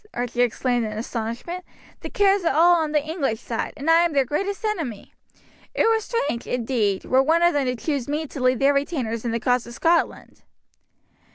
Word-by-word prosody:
Archie 245 Hz, 0 st, -2 dB
exclaimed 245 Hz, 0 st, +1 dB
in 215 Hz, -1 st, -4 dB
astonishment. 235 Hz, +10 st, -5 dB, 0.4 s
"The -, -, -7 dB
Kerrs 395 Hz, -2 st, +2 dB
are 330 Hz, -, +1 dB
all 345 Hz, +3 st, +6 dB
on 315 Hz, -2 st, -1 dB
the 300 Hz, 0 st, 0 dB
English 280 Hz, -9 st, -2 dB
side, 235 Hz, -1 st, -4 dB
and 285 Hz, -, -6 dB
I 325 Hz, 0 st, +6 dB
am 340 Hz, -2 st, 0 dB
their 275 Hz, -2 st, +3 dB
greatest 395 Hz, -, -3 dB
enemy. 320 Hz, -, -4 dB, 0.6 s
It -, -, +2 dB
were 450 Hz, 0 st, +3 dB
strange, 300 Hz, -, -3 dB
indeed, 225 Hz, -5 st, -1 dB
were 260 Hz, +1 st, +3 dB
one 325 Hz, +5 st, +2 dB
of 345 Hz, -, +4 dB
them 285 Hz, -2 st, +1 dB
to 250 Hz, -, 0 dB
choose 275 Hz, 0 st, -3 dB
me 300 Hz, +2 st, -2 dB
to 280 Hz, -2 st, -8 dB
lead 255 Hz, 0 st, +3 dB
their 275 Hz, +2 st, +3 dB
retainers 265 Hz, -6 st, -2 dB
in -, -, 0 dB
the 230 Hz, -, -1 dB
cause 245 Hz, 0 st, 0 dB
of 235 Hz, -, -9 dB
Scotland." 335 Hz, +3 st, 0 dB
275 Hz, 200 wpm, -23 LUFS, 240-330 Hz, 0.6 s, all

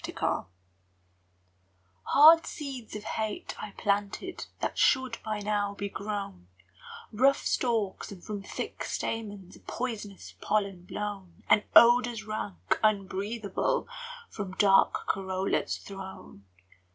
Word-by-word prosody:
Blight -, -, -1 dB, 1.6 s
Hard 320 Hz, +3 st, +7 dB
seeds 270 Hz, -8 st, -6 dB
of 210 Hz, -, -6 dB
hate 220 Hz, 0 st, -3 dB
I 215 Hz, -, -5 dB
planted 205 Hz, -, -1 dB
That -, -, -2 dB
should 260 Hz, -3 st, +3 dB
by 215 Hz, -1 st, -3 dB
now 205 Hz, -1 st, -1 dB
be 200 Hz, 0 st, -4 dB
grown, 200 Hz, -, -5 dB, 0.6 s
Rough 265 Hz, +5 st, +3 dB
stalks, 225 Hz, -7 st, 0 dB
and 185 Hz, -3 st, -10 dB
from 210 Hz, -2 st, -5 dB
thick 195 Hz, -, -5 dB
stamens 205 Hz, -5 st, -4 dB
A -, -, -18 dB
poisonous 220 Hz, -5 st, -5 dB
pollen 200 Hz, -4 st, -1 dB
blown, 200 Hz, -3 st, -6 dB
And 210 Hz, 0 st, +5 dB
odours 240 Hz, -1 st, +7 dB
rank, 95 Hz, -, -2 dB
unbreathable, 200 Hz, 0 st, 0 dB, 0.4 s
From 200 Hz, -, -6 dB
dark 195 Hz, 0 st, +4 dB
corollas 190 Hz, 0 st, -1 dB
thrown! 190 Hz, -, -10 dB
205 Hz, 110 wpm, -29 LUFS, 195-225 Hz, 1.6 s, Hard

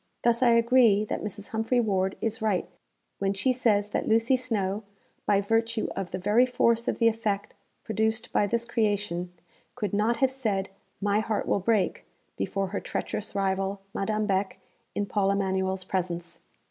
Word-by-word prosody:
Thus 235 Hz, 0 st, +3 dB
I 250 Hz, -, +5 dB
agree 230 Hz, -3 st, +5 dB
that -, -, -3 dB
Mrs. 205 Hz, -1 st, -6 dB
Humphry 225 Hz, +3 st, +1 dB
Ward 190 Hz, -4 st, 0 dB
is 225 Hz, -1 st, -2 dB
right 210 Hz, -4 st, +1 dB, 0.5 s
when 195 Hz, 0 st, 0 dB
she 255 Hz, +7 st, +2 dB
says 210 Hz, -5 st, +2 dB
that -, -, -2 dB
Lucy 230 Hz, +3 st, +4 dB
Snowe, 215 Hz, -6 st, -1 dB, 0.5 s
by 200 Hz, -1 st, +4 dB
virtue 225 Hz, +2 st, 0 dB
of 195 Hz, -2 st, -3 dB
the 185 Hz, -, -3 dB
very 210 Hz, +7 st, +3 dB
force 235 Hz, -2 st, +2 dB
of -, -, 0 dB
the 230 Hz, -, +4 dB
effect 220 Hz, -3 st, -1 dB, 0.3 s
produced 220 Hz, +1 st, -1 dB
by 205 Hz, -, +3 dB
this 235 Hz, +3 st, -1 dB
creation, 205 Hz, -6 st, -1 dB, 0.4 s
could 210 Hz, -6 st, -3 dB
not 215 Hz, +3 st, +2 dB
have 265 Hz, -1 st, +3 dB
said, 215 Hz, -8 st, -1 dB, 0.3 s
'My 205 Hz, +1 st, +2 dB
heart 220 Hz, -1 st, -1 dB
will -, -, +2 dB
break,' 200 Hz, -1 st, +1 dB, 0.3 s
before 195 Hz, -1 st, -2 dB
her 200 Hz, -, -2 dB
treacherous 210 Hz, -, -4 dB
rival 195 Hz, 0 st, 0 dB
Madame 215 Hz, +1 st, -1 dB
Beck, 195 Hz, -1 st, 0 dB, 0.4 s
in 205 Hz, -, 0 dB
Paul 200 Hz, -1 st, +1 dB
Emanuel's 190 Hz, -1 st, 0 dB
presence. 175 Hz, -2 st, -3 dB
210 Hz, 165 wpm, -27 LUFS, 195-230 Hz, 0.5 s, I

